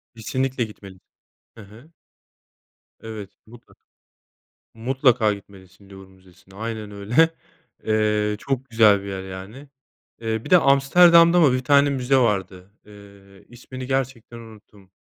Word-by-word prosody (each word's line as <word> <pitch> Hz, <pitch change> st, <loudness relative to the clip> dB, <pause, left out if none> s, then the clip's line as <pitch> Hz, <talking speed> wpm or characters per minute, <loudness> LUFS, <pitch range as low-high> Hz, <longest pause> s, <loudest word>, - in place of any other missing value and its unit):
Kesinlikle 130 Hz, +2 st, -3 dB
gitmelisin. 100 Hz, -3 st, -12 dB, 0.6 s
Hı 115 Hz, -, -12 dB
hı. 115 Hz, +10 st, -17 dB, 1.1 s
Evet, 110 Hz, -3 st, -9 dB, 0.2 s
mutlaka. 120 Hz, +1 st, -18 dB, 1.0 s
Mutlaka 120 Hz, -2 st, +1 dB
gitmelisin 100 Hz, -1 st, -17 dB
Louvre 95 Hz, -1 st, -13 dB
Müzesi'ne. 95 Hz, 0 st, -22 dB
Aynen. 110 Hz, 0 st, -6 dB
öyle. 110 Hz, +11 st, +1 dB, 0.6 s
Eee, 105 Hz, -1 st, 0 dB
çok 135 Hz, +1 st, -4 dB
güzel 110 Hz, -3 st, +4 dB
bir 100 Hz, -, -9 dB
yer, 95 Hz, -1 st, -6 dB
yani. 95 Hz, +9 st, -10 dB, 0.5 s
Eee, 110 Hz, -1 st, -4 dB
bir -, -, -10 dB
de 180 Hz, -, +7 dB
Amsterdam'da 170 Hz, +5 st, +5 dB
mı 145 Hz, -6 st, +4 dB
bir 130 Hz, 0 st, -2 dB
tane 140 Hz, +1 st, +3 dB
müze 135 Hz, 0 st, 0 dB
vardı? 95 Hz, -6 st, -1 dB, 0.2 s
Eee, 100 Hz, -1 st, -18 dB
ismini 130 Hz, +1 st, -10 dB
gerçekten 130 Hz, -3 st, -4 dB
unuttum. 105 Hz, -4 st, -17 dB
110 Hz, 125 wpm, -22 LUFS, 100-130 Hz, 1.1 s, de